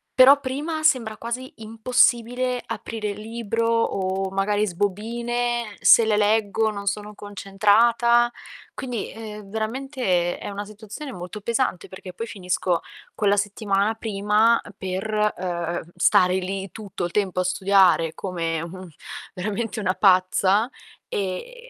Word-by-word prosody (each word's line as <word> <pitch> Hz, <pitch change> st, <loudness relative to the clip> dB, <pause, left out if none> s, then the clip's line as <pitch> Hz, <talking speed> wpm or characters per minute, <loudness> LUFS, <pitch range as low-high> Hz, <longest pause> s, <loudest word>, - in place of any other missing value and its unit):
Però 270 Hz, +2 st, +8 dB
prima 295 Hz, +4 st, -3 dB
sembra 245 Hz, -8 st, +2 dB
quasi 245 Hz, +3 st, -5 dB
impossibile 245 Hz, +2 st, +1 dB
aprire 215 Hz, -2 st, -4 dB
il 205 Hz, -, -8 dB
libro, 230 Hz, 0 st, -2 dB
o 195 Hz, -4 st, 0 dB
magari 205 Hz, +2 st, +1 dB
sbobine, 235 Hz, +4 st, -2 dB
se 230 Hz, -, +7 dB
le 215 Hz, -1 st, +2 dB
leggo 215 Hz, +1 st, +2 dB
non 200 Hz, -1 st, -7 dB
sono 210 Hz, +1 st, -3 dB
concentrata. 220 Hz, +4 st, +3 dB, 0.4 s
Quindi, 245 Hz, -5 st, -4 dB
ehm, 210 Hz, -2 st, -9 dB
veramente 255 Hz, +5 st, -4 dB, 0.3 s
è -, -, -16 dB
è -, -, -6 dB
una 205 Hz, +1 st, -5 dB
situazione 215 Hz, +7 st, -9 dB
molto 180 Hz, +4 st, -7 dB
pesante, 235 Hz, -3 st, -1 dB
perché 185 Hz, -1 st, -10 dB
poi 230 Hz, -, -5 dB
finisco 180 Hz, -3 st, -1 dB, 0.3 s
quella 205 Hz, -1 st, +2 dB
settimana 205 Hz, +1 st, 0 dB
prima 215 Hz, +1 st, +2 dB, 0.2 s
per, 210 Hz, +3 st, -1 dB
uhm, 175 Hz, -1 st, -3 dB, 0.2 s
stare 180 Hz, 0 st, +4 dB
lì 190 Hz, +1 st, -3 dB
tutto 200 Hz, -5 st, -5 dB
il 175 Hz, -, -4 dB
tempo 190 Hz, -2 st, 0 dB
a -, -, 0 dB
studiare 185 Hz, -3 st, +3 dB
come 165 Hz, -4 st, -3 dB
un 185 Hz, +2 st, -8 dB, 0.5 s
veramente 215 Hz, +4 st, -3 dB
una 185 Hz, -3 st, 0 dB
pazza, 190 Hz, +3 st, +3 dB, 0.4 s
e 480 Hz, -, -5 dB
210 Hz, 130 wpm, -23 LUFS, 195-235 Hz, 0.5 s, Però